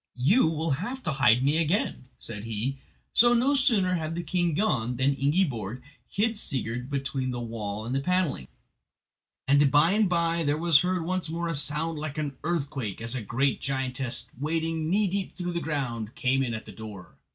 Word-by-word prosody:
"You 160 - +4
will 160 0 -1
have 255 +6 -5
to 155 - 0
hide 130 -3 +4
me 145 +4 +2
again," 165 - 0
said 105 -3 -5
he, 115 +5 -2 0.3
so 240 +1 +7
no 255 +4 +3
sooner 230 -10 +3
had 165 -2 -2
the 175 - -3
king 175 -1 0
gone 125 - 0
than 130 +3 +2
Ingiborg 135 - 0 0.3
hid 220 +1 0
Sigurd 125 - -3
between 135 -2 -2
the 125 -1 -3
wall 110 -3 -5
and 120 - -3
the 135 - +1
panelling, 180 - 0 1.0
and 140 +1 +5
by 150 +5 +5
and 210 -1 +3
by 170 -1 +1
there 145 0 +1
was 165 -2 +5
heard 180 0 0
once 185 -1 -2
more 170 +1 -2
a - - 0
sound 150 +2 -1
like 150 -1 -5
an 145 -3 -3
earthquake, 140 - -2
as 115 +1 -3
a 130 - -3
great 130 +6 0
giantess, 130 -2 -2
wading 160 +1 -1
knee 205 +4 +3
deep 195 +1 -3
through 175 -1 -3
the 170 - -2
ground, 120 -6 -2
came 135 +1 +1
in 120 -4 -1
at 110 - -7
the - - -10
door. 105 -5 -10
145 Hz, 190 wpm, -27 LUFS, 125-175 Hz, 1.0 s, so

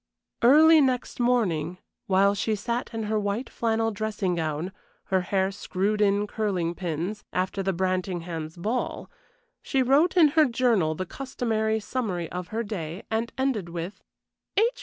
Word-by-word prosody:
Early 310 +6 +7
next 255 -3 0
morning, 185 -9 +1 0.3
while 200 0 +4
she 215 +2 0
sat 235 +4 -3
in 225 -1 -3
her 215 0 0
white 205 +5 -2
flannel 225 -1 0
dressing 210 -3 -2
gown, 160 +1 -2 0.4
her 190 - +4
hair 190 +1 0
screwed 200 +1 -1
in 205 0 +3
curling 195 -6 -1
pins, 175 +4 -4
after 185 +2 -1
the 195 0 0
Brantinghams' 175 -3 -2
ball, 220 +8 -3 0.5
she 265 -1 +1
wrote 290 +9 +3
in 320 -4 +7
her 310 +1 +5
journal 230 - +2
the 185 - -3
customary 220 -2 -1
summary 205 -7 -3
of 180 -1 -4
her 225 +5 -2
day, 180 -4 -5
and 225 +1 -1
ended 260 -9 0
with: 170 +3 -6 0.6
"H. 460 +4 +3
205 Hz, 150 wpm, -26 LUFS, 180-235 Hz, 0.6 s, Early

